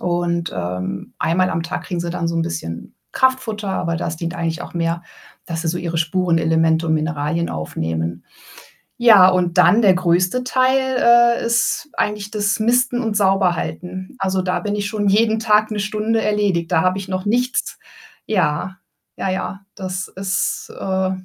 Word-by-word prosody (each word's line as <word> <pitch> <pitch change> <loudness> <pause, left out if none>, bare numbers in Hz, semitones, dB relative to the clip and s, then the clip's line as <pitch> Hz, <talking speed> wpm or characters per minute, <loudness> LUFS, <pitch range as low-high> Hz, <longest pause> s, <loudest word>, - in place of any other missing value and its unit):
Und, 175 -1 -1
ähm, 90 +2 -4
einmal 185 +3 +1
am 165 - -1
Tag 165 - -5
kriegen 175 -2 -3
sie 170 0 -3
dann 170 -1 -2
so 170 - -2
'n 165 - +1
bisschen 85 - -6 0.2
Kraftfutter, 250 -6 0
aber 170 -3 -1
das 165 -1 -3
dient 170 +1 -4
eigentlich 165 0 -2
auch - - -10
mehr, 170 0 -1 0.4
dass 165 -2 -4
sie 165 - -1
so 175 +2 -1
ihre 170 -1 -3
Spurenelemente 165 -1 +1
und 160 - +2
Mineralien 155 +1 -1
aufnehmen. 80 +2 -4 0.7
Ja, 215 -6 +7
und 180 -1 +1
dann 180 +6 +6
der 195 -3 +6
größte 180 +6 +1
Teil, 255 +1 +2 0.6
äh, - - -4
ist 235 +6 +1
eigentlich 210 -1 -2
das 210 0 0
Misten 245 +2 +2
und 220 -2 -2
Sauberhalten. 185 0 0
Also, 190 0 0
da 180 0 -1
bin 205 -1 -2
ich 205 0 -2
schon 205 -2 -1
jeden 220 +2 +3
Tag 215 -1 +3
1 215 - -3
Stunde 215 +2 0
erledigt. 200 -6 0
Da 160 - +4
habe 185 +1 +1
ich 195 -1 -7
noch 185 0 -3
nichts 250 +4 0 0.5
ja, 185 -2 0 0.4
ja, 190 - -1
ja, 190 +1 -3 0.2
das 185 -1 -4
ist, 190 0 -2
äh, 190 -1 -1
185 Hz, 170 wpm, -20 LUFS, 165-210 Hz, 0.7 s, Ja